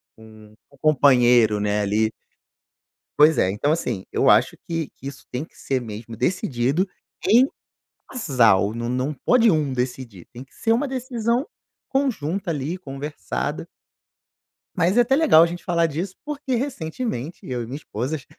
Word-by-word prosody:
com 110 -1 -16 0.2
o 140 - -20
companheiro, 125 -7 +4
né, 105 0 0
ali. 110 +2 +1 1.1
Pois 155 +1 +6
é, 95 - +3
então, 105 +10 0
assim, 120 - -2
eu - - +3
acho - - +4
que 165 -3 -3
que 135 - -9
isso 140 - -9
tem 125 +4 -3
que - - -17
ser 130 -2 -2
mesmo 115 0 -8
decidido 145 - 0 0.4
em 240 +6 +6 0.6
casal, 115 - +2
não 120 0 -4
não 130 +4 -1
pode 235 - +3
1 150 -5 +1
decidir, 125 -6 -4
tem 125 +2 -10
que - - -29
ser 225 - 0
uma 280 +5 0
decisão 250 - -1 0.4
conjunta 200 - -1
ali, 155 +3 -2
conversada 145 -3 -5 1.1
mas 180 +7 +2
é - - +8
até 265 +3 +2
legal 275 - +6
a - - +5
gente 175 +1 -6
falar 170 -1 +1
disso, 175 +5 -4
porque 290 -3 -3
recentemente, 180 - -4
eu 125 -2 -4
e - - -6
minha 130 +4 -7
esposas, 135 +2 -5
145 Hz, 155 wpm, -23 LUFS, 120-195 Hz, 1.1 s, é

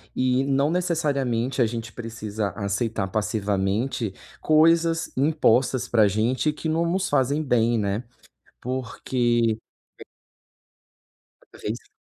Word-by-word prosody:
E 130 +1 +2
não 140 +2 +1
necessariamente 140 -8 0
a - - +5
gente 115 0 -6
precisa 110 -3 -4
aceitar 100 0 -2
passivamente, 105 +2 -1 0.3
coisas 165 +1 +3
impostas 130 -3 +2
para 115 -2 +4
a - - +5
gente 115 +9 +1
que 150 +2 -6
não 165 +2 +1
nos 190 +2 0
fazem 140 +4 +1
bem, 120 -3 +2
né, 100 +2 -1 0.6
porque 120 -2 0 0.4
é - - -9 1.4
Cada - - -19
vez - - -2
mais. - - -31
125 Hz, 120 wpm, -24 LUFS, 110-145 Hz, 1.4 s, a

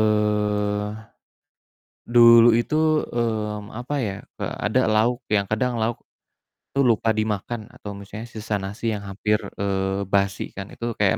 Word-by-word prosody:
Eee, 105 -1 +1 1.2
dulu 115 -1 +7
itu, 155 +6 +2
mmm, 110 -3 -2
apa 125 +5 -4
ya, 100 -2 -3 0.2
eee, - - -3
ada 115 +5 +2
lauk 110 +3 +2
yang 100 -1 +2
kadang 125 +3 0
lauk 115 +1 0 0.8
tuh 140 - +4
lupa 115 -2 +3
dimakan 110 +1 -1
atau 100 -1 -8
misalnya 105 +4 -8
sisa 110 -2 -3
nasi 105 +4 -3
yang 105 - -4
hampir, 105 +2 0 0.2
eee, 95 0 -1
basi 100 0 0
kan. 95 0 -7
Itu 115 0 -4
kayak 105 -3 +2
105 Hz, 140 wpm, -23 LUFS, 105-115 Hz, 1.2 s, dulu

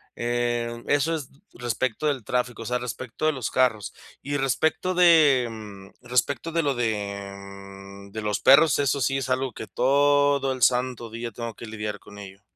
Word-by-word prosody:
Eh, 120 0 -2
eso 145 +3 +2
es 145 -5 -6 0.2
respecto 120 +4 -2
del 130 -6 -1
tráfico, 125 -1 -2
o - - -11
sea, 125 +1 -1
respecto 125 +3 -5
de 155 - +2
los 130 -5 -4
carros. 125 -5 +1 0.3
Y 145 +1 -2
respecto 160 +7 0
de, 155 -8 +5
mm, 105 +1 -12
respecto 125 +5 0
de 165 -1 +1
lo 140 -2 +1
de, 100 -4 -3
mm, 100 0 -12
de 110 - -5
los 105 -1 -1
perros, 145 +2 +6
eso 140 0 +1
sí 135 +3 +1
es 135 -1 -3
algo 130 0 0
que 110 - -8
todo 140 +1 +2
el 130 - -4
santo 125 -2 +1
día 115 0 -5
tengo 115 +1 -6
que 115 - -10
lidiar 105 -2 -5
con 105 0 -14
ello. 100 0 -11
120 Hz, 180 wpm, -25 LUFS, 110-135 Hz, 0.3 s, perros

